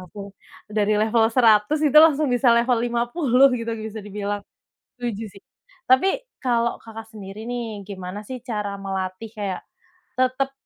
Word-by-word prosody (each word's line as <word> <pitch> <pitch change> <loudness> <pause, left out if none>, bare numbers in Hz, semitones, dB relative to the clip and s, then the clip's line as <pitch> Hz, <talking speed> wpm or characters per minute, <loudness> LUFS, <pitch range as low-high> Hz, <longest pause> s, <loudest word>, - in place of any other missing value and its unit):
langsung 200 +3 -9 0.5
dari 210 0 +2
level 220 +2 +3
100 225 +3 +5
itu 300 +1 +6
langsung 305 -1 +3
bisa 245 0 +3
level 235 0 +2
50 240 +3 +2
gitu 230 0 -6 0.2
bisa 220 0 -7
dibilang, 205 0 -3 0.6
setuju 235 -3 -4
sih. - - -29 0.5
Tapi, 260 +9 +5 0.3
kalau 235 -2 +1
Kakak 225 -1 -9
sendiri 200 +1 -8
nih, 230 -4 -4
gimana 190 0 -6
sih 255 - -5
cara 205 -3 -3
melatih 190 +2 -4
kayak 200 -3 -3 0.6
tetep 255 +1 +1
225 Hz, 140 wpm, -23 LUFS, 205-245 Hz, 0.6 s, itu